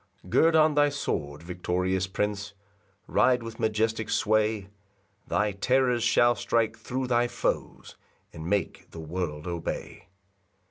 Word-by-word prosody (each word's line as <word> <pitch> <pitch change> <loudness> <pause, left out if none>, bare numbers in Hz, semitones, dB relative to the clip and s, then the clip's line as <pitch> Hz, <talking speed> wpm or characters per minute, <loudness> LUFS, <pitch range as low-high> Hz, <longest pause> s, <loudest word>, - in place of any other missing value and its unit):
3 - - -15
Gird 165 0 +4
on 155 -1 +5
thy 145 0 +4
sword, 75 - -3
victorious 90 +1 -1
Prince, 100 +1 -2 0.5
Ride 125 -2 +3
with 115 -1 -8
majestic 110 0 0
sway; 110 -2 +1 0.6
Thy 105 0 +1
terrors 125 +4 +2
shall 120 +1 +4
strike 115 0 0
thro' 125 +4 -4
thy 120 -1 +2
foes, - - -3 0.4
And 80 0 -7
make 100 -4 -2
the 80 - -10
world 80 -2 -4
obey. 85 -2 -5
110 Hz, 130 wpm, -27 LUFS, 90-120 Hz, 0.6 s, on